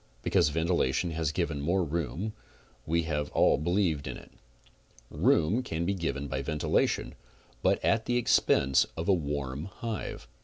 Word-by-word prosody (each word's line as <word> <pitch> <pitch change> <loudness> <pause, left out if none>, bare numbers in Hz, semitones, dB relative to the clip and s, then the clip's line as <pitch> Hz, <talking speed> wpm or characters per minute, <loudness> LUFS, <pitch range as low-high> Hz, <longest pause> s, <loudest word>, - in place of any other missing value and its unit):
Because 85 -6 +3
ventilation 80 0 0
has 80 -2 -1
given 70 0 -2
more 90 +5 +1
room 85 - -3 0.5
we 85 +1 +1
have 75 -2 -2
all - - +4
believed 85 -3 0
in - - -5
it. - - -14 0.8
Room 100 +11 +2
can 85 -9 -3
be 100 - +1
given 70 -6 -3
by 65 0 -2
ventilation 75 +2 0 0.5
but - - +3
at 110 0 +2
the 120 - +2
expense 70 - +3
of 80 - -3
a 100 - +5
warm 70 -3 -2
hive. 105 - -6
80 Hz, 150 wpm, -29 LUFS, 70-90 Hz, 0.8 s, a